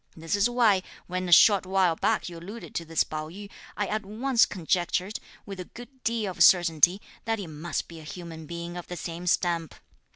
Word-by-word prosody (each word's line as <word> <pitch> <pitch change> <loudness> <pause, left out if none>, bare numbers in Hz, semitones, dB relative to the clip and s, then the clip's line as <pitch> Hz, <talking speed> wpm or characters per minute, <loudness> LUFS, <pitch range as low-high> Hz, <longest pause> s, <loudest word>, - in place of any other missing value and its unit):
This 165 +4 -2
is 205 +4 +3
why, 230 -6 +3 0.2
when 185 0 -3
a - - -3
short 200 +4 +7
while 185 -3 +2
back - - 0
you 175 - -8
alluded 205 +7 -9
to 170 - -3
this 160 0 +1
Pao 155 0 -6
yü, 200 +4 -10 0.3
I 205 - 0
at 215 +2 -2
once 230 +5 +2
conjectured, 180 +2 -1 0.3
with 195 -2 -8
a 180 - -5
good 245 +5 -13
deal 225 -4 -1
of - - +3
certainty, 175 0 +5 0.3
that 225 0 0
he 200 - -5
must 160 +1 -4
be 165 -1 -11
a - - -11
human 160 -1 -8
being 170 +1 -6
of 175 - -7
the 180 - -6
same 170 +1 -6
stamp. 170 -2 0
180 Hz, 205 wpm, -27 LUFS, 170-205 Hz, 0.3 s, short